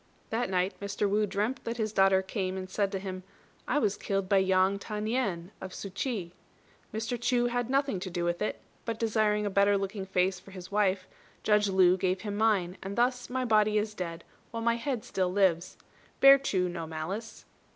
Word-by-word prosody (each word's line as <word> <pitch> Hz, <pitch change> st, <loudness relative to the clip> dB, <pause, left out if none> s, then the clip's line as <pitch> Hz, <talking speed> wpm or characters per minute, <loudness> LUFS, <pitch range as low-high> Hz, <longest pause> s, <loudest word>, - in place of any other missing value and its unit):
That 230 Hz, -1 st, 0 dB
night 185 Hz, 0 st, +1 dB
Mr. 200 Hz, +1 st, -1 dB
Wu 210 Hz, +1 st, +1 dB
dreamt 215 Hz, +6 st, -2 dB
that 230 Hz, +1 st, -4 dB
his 215 Hz, -2 st, -2 dB
daughter 195 Hz, -1 st, +4 dB
came 190 Hz, -1 st, -3 dB
and 185 Hz, 0 st, -5 dB
said 195 Hz, +1 st, -1 dB
to 195 Hz, -, -2 dB
him, 190 Hz, -1 st, -5 dB, 0.5 s
"I -, -, +1 dB
was 210 Hz, -8 st, +1 dB
killed 195 Hz, -1 st, -2 dB
by 195 Hz, -, +4 dB
Yang 190 Hz, +1 st, +3 dB
Ta 210 Hz, +1 st, -5 dB
nien, 210 Hz, -6 st, -1 dB
of 190 Hz, -1 st, -7 dB
Su 200 Hz, -, -6 dB
ch'i. 195 Hz, -4 st, -3 dB, 0.6 s
Mr. 225 Hz, +2 st, -3 dB
Chu 240 Hz, 0 st, +2 dB
had 245 Hz, 0 st, -1 dB
nothing 270 Hz, -6 st, +1 dB
to 185 Hz, +1 st, -5 dB
do 175 Hz, -1 st, -2 dB
with 175 Hz, 0 st, -1 dB
it; 210 Hz, -, -2 dB, 0.2 s
but 230 Hz, -1 st, -3 dB
desiring 215 Hz, -2 st, +1 dB
a 205 Hz, -, -1 dB
better 200 Hz, +1 st, +4 dB
looking 195 Hz, 0 st, -4 dB
face 185 Hz, 0 st, +1 dB
for 190 Hz, -, -16 dB
his 185 Hz, -1 st, -10 dB
wife, 195 Hz, -2 st, +1 dB, 0.4 s
Judge 210 Hz, -1 st, +3 dB
Lu 185 Hz, -1 st, +5 dB
gave 185 Hz, 0 st, 0 dB
him 205 Hz, -2 st, -4 dB
mine, 200 Hz, -4 st, +1 dB
and 195 Hz, +1 st, -5 dB
thus 245 Hz, +1 st, +1 dB
my 255 Hz, 0 st, -1 dB
body 215 Hz, -2 st, +3 dB
is 210 Hz, 0 st, -1 dB
dead 170 Hz, -4 st, -5 dB, 0.3 s
while 230 Hz, -1 st, -5 dB
my 235 Hz, 0 st, +2 dB
head 240 Hz, -2 st, -3 dB
still 185 Hz, -1 st, -1 dB
lives. 185 Hz, -3 st, +1 dB, 0.4 s
Bear 275 Hz, 0 st, +9 dB
Chu 190 Hz, -9 st, 0 dB
no 170 Hz, -2 st, -5 dB
malice." 175 Hz, +8 st, -6 dB
200 Hz, 205 wpm, -29 LUFS, 185-220 Hz, 0.6 s, Bear